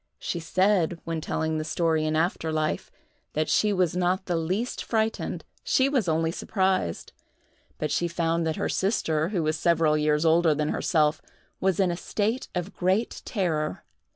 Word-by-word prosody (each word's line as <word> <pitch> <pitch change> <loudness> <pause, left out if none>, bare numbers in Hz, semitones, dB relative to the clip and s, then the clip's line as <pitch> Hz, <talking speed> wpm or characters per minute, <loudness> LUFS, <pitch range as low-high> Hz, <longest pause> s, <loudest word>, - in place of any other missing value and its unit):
She 175 - -3
said, 185 0 +2
when 165 -1 -3
telling 160 0 -1
the - - -2
story 160 0 +1
in 155 0 0
after 160 0 0
life, 155 0 -1 0.4
that 155 +1 0
she 210 - +3
was 180 -4 +1
not 180 +1 +1
the 175 - -1
least 185 +9 -2
frightened—she 225 +4 -1
was 250 -11 +1
only 160 +1 +1
surprised! 190 - -1 0.6
but 150 - -2
she 175 - +1
found 170 0 0
that 160 - -1
her - - -1
sister, 165 -5 0
who 185 -6 -1
was 155 0 0
several 165 -2 +3
years 150 +1 +2
older 160 -1 +4
than 150 0 -1
herself, 155 -2 +1 0.4
was 190 -1 +1
in 185 -2 +3
a 170 - -3
state 220 +7 -1
of 180 +2 -3
great 190 +6 0
terror. 160 -8 -1
170 Hz, 165 wpm, -26 LUFS, 155-190 Hz, 0.6 s, older